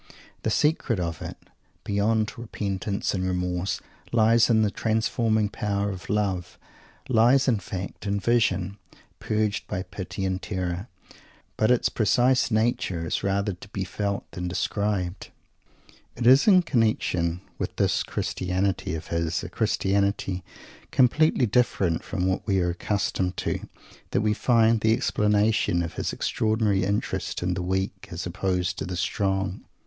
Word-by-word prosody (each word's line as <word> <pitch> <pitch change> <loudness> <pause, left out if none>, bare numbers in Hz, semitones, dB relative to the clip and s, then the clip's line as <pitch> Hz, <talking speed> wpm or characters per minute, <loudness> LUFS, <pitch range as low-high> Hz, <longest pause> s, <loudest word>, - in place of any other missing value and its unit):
The - - -1
secret 135 - +1
of 85 -2 -3
it, - - -6 0.5
beyond 110 +2 +1
repentance 100 -3 -3
and 95 -2 -1
remorse, 90 0 -1 0.3
lies 115 +1 +4
in 110 -2 +4
the 105 - +1
transforming 110 0 +1
power 100 0 -1
of 95 -2 -9
"love;" 95 -4 -1 0.5
lies, 130 +2 +4
in 115 -5 +3
fact, 95 +2 -6
in 100 0 0
"vision" 100 -4 +1 0.4
purged 105 -1 -1
by 95 - -3
pity 95 +1 -5
and 95 0 -1
terror; 90 +1 -3 0.7
but 110 - +2
its 125 -1 +4
precise 125 +5 +2
nature 110 -7 0
is - - -1
rather 100 +1 0
to 90 +3 -12
be 100 -2 -3
felt 100 +2 -3
than 90 0 -4
described. 95 0 -2 0.9
It 120 - -3
is 130 - +7
in 185 -3 +7
connection 90 - +1 0.2
with - - -3
this - - +2
Christianity 95 -2 -1
of 80 - -7
his, 85 0 -1
a - - -5
Christianity 100 -2 0 0.5
completely 135 +2 +3
different 100 -7 +1
from 90 -4 -2
what 95 +3 -1
we 95 -2 +2
are 90 -1 +1
accustomed 95 0 -1
to, - - -3 0.4
that - - +1
we 105 -1 +2
find 115 -1 +3
the 110 0 +4
explanation 105 -5 +2
of 85 - -5
his - - -2
extraordinary 110 -3 +1
interest 100 -2 -2
in 90 +1 0
the 90 - -3
"weak" 95 +2 -2
as 85 0 -5
opposed 90 -1 -1
to - - -3
the 90 -1 -4
"strong." 95 0 -1
100 Hz, 145 wpm, -26 LUFS, 90-110 Hz, 0.9 s, is